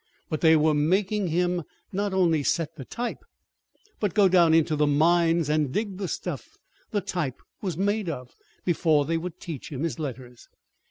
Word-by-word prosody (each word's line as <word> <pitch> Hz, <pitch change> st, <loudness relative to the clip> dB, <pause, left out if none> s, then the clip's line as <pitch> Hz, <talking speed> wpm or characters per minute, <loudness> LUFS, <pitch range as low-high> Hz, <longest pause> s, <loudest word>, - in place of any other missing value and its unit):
But 155 Hz, -, -2 dB
they 160 Hz, -1 st, +6 dB
were 155 Hz, 0 st, +3 dB
making 190 Hz, +7 st, +1 dB
him 175 Hz, +1 st, +1 dB, 0.3 s
not 200 Hz, +1 st, -1 dB
only 175 Hz, -5 st, +2 dB
set 160 Hz, +2 st, -1 dB
the 135 Hz, -, -8 dB
type, 240 Hz, -, -5 dB, 0.8 s
but 205 Hz, -5 st, -1 dB
go 205 Hz, -2 st, +6 dB
down 175 Hz, -3 st, +5 dB
into 160 Hz, -1 st, +3 dB
the 150 Hz, 0 st, +2 dB
mines 165 Hz, +2 st, +3 dB
and 150 Hz, -3 st, +1 dB
dig 205 Hz, +2 st, -2 dB
the 195 Hz, -, -2 dB
stuff -, -, -5 dB, 0.3 s
the 205 Hz, -, -1 dB
type 175 Hz, -9 st, -3 dB, 0.2 s
was 185 Hz, -6 st, -3 dB
made 205 Hz, 0 st, 0 dB
of 125 Hz, -5 st, -6 dB, 0.3 s
before 160 Hz, -4 st, +2 dB
they 165 Hz, +3 st, 0 dB
would 175 Hz, +1 st, -6 dB
teach 160 Hz, -4 st, -7 dB
him 140 Hz, +1 st, -4 dB
his 165 Hz, 0 st, -2 dB
letters. 125 Hz, -4 st, -7 dB
165 Hz, 175 wpm, -26 LUFS, 150-185 Hz, 0.8 s, they